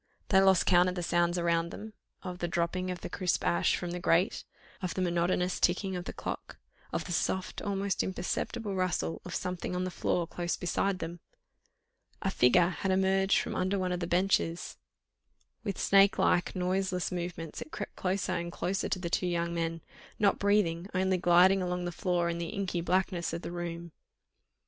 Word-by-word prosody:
They 190 Hz, -1 st, +6 dB
lost 190 Hz, -2 st, +5 dB
count 180 Hz, 0 st, +5 dB
of 180 Hz, -, -4 dB
the 175 Hz, -, -3 dB
sounds 175 Hz, +1 st, +2 dB
around 170 Hz, -1 st, +1 dB
them, 215 Hz, +4 st, -8 dB, 0.3 s
of 180 Hz, -1 st, -6 dB
the 175 Hz, -, -1 dB
dropping 175 Hz, +2 st, -1 dB
of 180 Hz, -1 st, -5 dB
crisp 180 Hz, -, 0 dB
ash 85 Hz, +1 st, +3 dB
from 175 Hz, -, -4 dB
the 180 Hz, -, -3 dB
grate, 180 Hz, +3 st, +2 dB, 0.4 s
of 185 Hz, -2 st, -3 dB
the 185 Hz, -, -1 dB
monotonous 180 Hz, +1 st, +1 dB
ticking 185 Hz, +2 st, +1 dB
of 175 Hz, 0 st, -4 dB
the -, -, -4 dB
clock, -, -, -6 dB, 0.3 s
of -, -, -2 dB
the 180 Hz, -, -6 dB
soft, 185 Hz, +2 st, -1 dB
almost 200 Hz, -1 st, -1 dB
imperceptible 200 Hz, +3 st, -3 dB
rustle 175 Hz, -, -1 dB
of -, -, -6 dB
something 180 Hz, 0 st, -3 dB
on 180 Hz, -, -1 dB
the 185 Hz, -, -3 dB
floor 175 Hz, 0 st, 0 dB
close 175 Hz, +1 st, -3 dB
beside 190 Hz, +2 st, 0 dB
them. 170 Hz, 0 st, -6 dB, 1.0 s
A -, -, +1 dB
figure 170 Hz, +8 st, +4 dB
had 190 Hz, +1 st, -3 dB
emerged 190 Hz, +1 st, +3 dB
from -, -, -2 dB
under 190 Hz, +2 st, 0 dB
one 185 Hz, -1 st, -1 dB
of 180 Hz, -, -1 dB
the 170 Hz, -, -3 dB
benches; 175 Hz, -1 st, +1 dB, 0.9 s
with 200 Hz, -, -3 dB
snake 195 Hz, 0 st, +5 dB
like, 175 Hz, -, +2 dB
noiseless 185 Hz, 0 st, 0 dB
movements 175 Hz, -3 st, -5 dB
it -, -, -7 dB
crept -, -, -6 dB
closer 190 Hz, +1 st, -1 dB
and 170 Hz, 0 st, -3 dB
closer 190 Hz, +3 st, -2 dB
to -, -, 0 dB
the 180 Hz, -2 st, -4 dB
two 180 Hz, +1 st, 0 dB
young 170 Hz, -1 st, -1 dB
men, 165 Hz, -1 st, -2 dB, 0.4 s
not 200 Hz, -1 st, +3 dB
breathing, 195 Hz, -4 st, +2 dB
only 190 Hz, 0 st, +2 dB
gliding 180 Hz, +2 st, +5 dB
along 180 Hz, 0 st, -2 dB
the 175 Hz, -, -2 dB
floor, 175 Hz, 0 st, 0 dB
in 170 Hz, 0 st, -2 dB
the 170 Hz, -1 st, -3 dB
inky 190 Hz, -3 st, -2 dB
blackness 180 Hz, 0 st, 0 dB
of 170 Hz, -, -4 dB
the -, -, -5 dB
room. 170 Hz, -1 st, -5 dB
180 Hz, 185 wpm, -30 LUFS, 170-190 Hz, 1.0 s, They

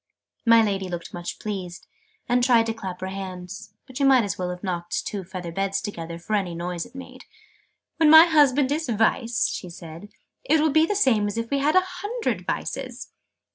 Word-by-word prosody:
My 230 Hz, -1 st, +7 dB
Lady 195 Hz, -3 st, -2 dB
looked 170 Hz, -1 st, -6 dB
much 175 Hz, 0 st, -6 dB
pleased, 185 Hz, -4 st, -6 dB, 0.4 s
and 245 Hz, 0 st, +2 dB
tried 240 Hz, -3 st, +4 dB
to 225 Hz, -, -2 dB
clap 190 Hz, -5 st, -7 dB
her 190 Hz, -, -3 dB
hands: 195 Hz, +1 st, -8 dB
but 260 Hz, -1 st, -9 dB
you 280 Hz, -, +2 dB
might 260 Hz, -3 st, +5 dB
as 200 Hz, -, -2 dB
well 180 Hz, -1 st, -3 dB
have 180 Hz, 0 st, -7 dB
knocked 175 Hz, -2 st, -3 dB
two 200 Hz, -2 st, -4 dB
feather 180 Hz, -1 st, -7 dB
beds 195 Hz, +2 st, -1 dB
together, 170 Hz, -5 st, -6 dB
for 175 Hz, +5 st, -6 dB
any 190 Hz, -5 st, 0 dB
noise 175 Hz, 0 st, -4 dB
it -, -, -23 dB
made. 255 Hz, -1 st, -11 dB, 0.7 s
"When 320 Hz, -2 st, +5 dB
my 320 Hz, +2 st, +10 dB
husband 290 Hz, -4 st, +3 dB
is 310 Hz, -2 st, -1 dB
Vice," 230 Hz, +1 st, +1 dB
she 180 Hz, -, -6 dB
said, 170 Hz, +2 st, -10 dB, 0.3 s
"it 320 Hz, -11 st, +3 dB
will 310 Hz, 0 st, +2 dB
be 315 Hz, +2 st, +4 dB
the 415 Hz, -, -1 dB
same 230 Hz, -, +3 dB
as 205 Hz, -, -4 dB
if 230 Hz, +2 st, -4 dB
we 280 Hz, -, +1 dB
had 295 Hz, +4 st, +1 dB
a 370 Hz, 0 st, +5 dB, 0.2 s
hundred 460 Hz, +4 st, -3 dB
Vices!" -, -, -4 dB
210 Hz, 205 wpm, -24 LUFS, 180-265 Hz, 0.7 s, my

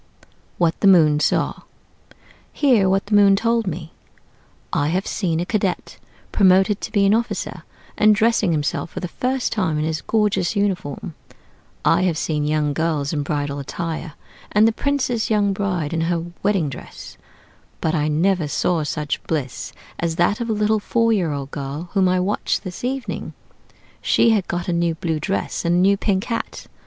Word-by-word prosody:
WHAT 165 Hz, -2 st, +1 dB
THE 200 Hz, -, +3 dB
MOON 155 Hz, -6 st, +6 dB
SAW -, -, 0 dB, 0.9 s
Hear 240 Hz, -10 st, +3 dB
what 195 Hz, +1 st, +1 dB
the 205 Hz, -, -4 dB
Moon 200 Hz, -1 st, +6 dB
told 230 Hz, +1 st, +1 dB
me: 165 Hz, -1 st, -5 dB, 0.8 s
"I 145 Hz, -, +1 dB
have 180 Hz, +5 st, 0 dB
seen 170 Hz, -6 st, -1 dB
a 175 Hz, -, -1 dB
cadet 195 Hz, -2 st, -2 dB, 0.3 s
promoted 190 Hz, +1 st, +4 dB
to -, -, -5 dB
be 200 Hz, -3 st, +3 dB
an 195 Hz, -, +4 dB
officer, 230 Hz, +1 st, -2 dB, 0.4 s
and 215 Hz, 0 st, +6 dB
dressing 220 Hz, -3 st, +2 dB
himself 150 Hz, +1 st, -1 dB
for 185 Hz, -, -6 dB
the 180 Hz, -, -4 dB
first 255 Hz, +7 st, -1 dB
time 185 Hz, -8 st, 0 dB
in 150 Hz, -, 0 dB
his 160 Hz, -1 st, -2 dB
gorgeous 210 Hz, -4 st, 0 dB
uniform; 185 Hz, -7 st, -2 dB, 0.7 s
I 170 Hz, -, +4 dB
have 180 Hz, -4 st, +1 dB
seen 150 Hz, -2 st, -1 dB
young 150 Hz, -1 st, +1 dB
girls 155 Hz, -2 st, -1 dB
in 150 Hz, -, 0 dB
bridal 145 Hz, 0 st, -2 dB
attire, 160 Hz, +2 st, -5 dB, 0.4 s
and 210 Hz, +2 st, +5 dB
the -, -, +3 dB
prince's 255 Hz, -2 st, -1 dB
young 205 Hz, -2 st, +2 dB
bride 180 Hz, -6 st, -2 dB
in 165 Hz, -, 0 dB
her 170 Hz, 0 st, -1 dB, 0.2 s
wedding 195 Hz, -6 st, +1 dB
dress: 135 Hz, -, -9 dB, 0.6 s
but 160 Hz, -, 0 dB
I 150 Hz, -3 st, +1 dB
never 165 Hz, +2 st, +1 dB
saw 165 Hz, +3 st, 0 dB
such 150 Hz, 0 st, -3 dB
bliss 140 Hz, -6 st, -3 dB, 0.3 s
as 165 Hz, -1 st, -1 dB
that 200 Hz, +6 st, +1 dB
of 235 Hz, -, -3 dB
a -, -, +2 dB
little 210 Hz, +1 st, +1 dB
four 230 Hz, +2 st, +1 dB
year 180 Hz, -7 st, 0 dB
old 140 Hz, -1 st, -5 dB
girl 145 Hz, +5 st, -5 dB
whom 190 Hz, -2 st, +3 dB
I 185 Hz, 0 st, +2 dB
watched 195 Hz, +3 st, -1 dB
this 185 Hz, +1 st, -7 dB
evening. 260 Hz, 0 st, -3 dB, 0.7 s
She 230 Hz, -, +3 dB
had 205 Hz, -4 st, +1 dB
got 175 Hz, 0 st, -3 dB
a 175 Hz, -, 0 dB
new 170 Hz, -1 st, +1 dB
blue 160 Hz, -1 st, -2 dB
dress, 195 Hz, +6 st, -2 dB
and 170 Hz, 0 st, +2 dB
a -, -, +3 dB
new 195 Hz, +2 st, +4 dB
pink 195 Hz, -1 st, 0 dB
hat. 230 Hz, -1 st, -4 dB
180 Hz, 180 wpm, -21 LUFS, 160-210 Hz, 0.9 s, MOON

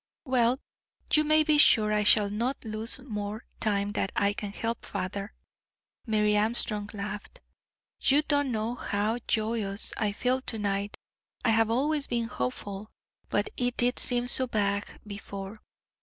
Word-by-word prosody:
"Well, 255 Hz, -1 st, +2 dB, 0.5 s
you 305 Hz, -, +6 dB
may 310 Hz, +1 st, +4 dB
be 305 Hz, -1 st, +3 dB
sure 215 Hz, -6 st, +6 dB
I 210 Hz, -, +2 dB
shall 210 Hz, -1 st, +4 dB
not 235 Hz, +5 st, -2 dB
lose 220 Hz, +3 st, -1 dB
more 215 Hz, -4 st, -6 dB
time 205 Hz, -2 st, 0 dB
than 205 Hz, -, -1 dB
I 200 Hz, 0 st, +2 dB
can 205 Hz, -1 st, -5 dB
help, 230 Hz, +3 st, -4 dB
father." 200 Hz, +2 st, -5 dB, 0.7 s
Mary 210 Hz, -1 st, +2 dB
Armstrong 210 Hz, -1 st, +1 dB
laughed. 210 Hz, -, -7 dB, 0.6 s
"You 285 Hz, +3 st, +4 dB
don't 285 Hz, -3 st, +1 dB
know 220 Hz, +1 st, -2 dB
how 220 Hz, -1 st, -2 dB
joyous 215 Hz, -2 st, 0 dB
I 215 Hz, -2 st, 0 dB
feel 255 Hz, +5 st, 0 dB
to 230 Hz, -, -4 dB
night, 200 Hz, -1 st, -2 dB, 0.5 s
I -, -, +4 dB
have 225 Hz, 0 st, +3 dB
always 285 Hz, +5 st, 0 dB
been 235 Hz, -1 st, -1 dB
hopeful, 195 Hz, +8 st, -5 dB, 0.4 s
but -, -, 0 dB
it 245 Hz, 0 st, -1 dB
did 245 Hz, +1 st, +3 dB
seem 245 Hz, -1 st, +4 dB
so 255 Hz, +1 st, +4 dB
vague 205 Hz, -3 st, 0 dB, 0.2 s
before. 200 Hz, 0 st, -8 dB
220 Hz, 150 wpm, -28 LUFS, 205-245 Hz, 0.7 s, you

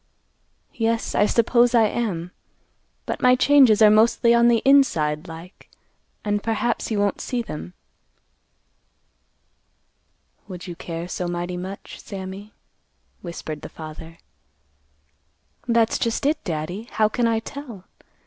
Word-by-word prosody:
"Yes, 225 Hz, 0 st, -1 dB
I 205 Hz, -, +3 dB
suppose 240 Hz, +2 st, +3 dB
I 230 Hz, -, +6 dB
am; 195 Hz, -6 st, -2 dB, 0.7 s
but -, -, -4 dB
my 250 Hz, 0 st, +5 dB
changes 255 Hz, -5 st, +5 dB
are 210 Hz, -, +8 dB
mostly 230 Hz, +2 st, +4 dB
on 235 Hz, 0 st, +5 dB
the 235 Hz, -2 st, +3 dB
inside 165 Hz, -, +3 dB
like; 165 Hz, +3 st, -12 dB, 0.6 s
and 205 Hz, 0 st, 0 dB
perhaps 230 Hz, +2 st, -1 dB
he 220 Hz, -, -2 dB
won't 205 Hz, 0 st, 0 dB
see 245 Hz, -2 st, -2 dB
them." 175 Hz, -2 st, -8 dB, 2.7 s
"Would 180 Hz, -3 st, -8 dB
you 175 Hz, -2 st, -7 dB
care 165 Hz, 0 st, -6 dB
so 180 Hz, 0 st, -4 dB
mighty 175 Hz, +1 st, -3 dB
much, 190 Hz, +2 st, -8 dB
Sammy?" 195 Hz, +1 st, -8 dB, 0.7 s
whispered 160 Hz, -3 st, -7 dB
the -, -, -8 dB
father. 160 Hz, +1 st, -10 dB, 1.5 s
"That's 230 Hz, -1 st, +2 dB
just 230 Hz, +3 st, -1 dB
it, 300 Hz, +2 st, +1 dB
Daddy. 175 Hz, +6 st, -4 dB
How 215 Hz, -1 st, +3 dB
can 235 Hz, +2 st, 0 dB
I 225 Hz, -1 st, +1 dB
tell? 235 Hz, -4 st, -8 dB
210 Hz, 125 wpm, -23 LUFS, 175-235 Hz, 2.7 s, are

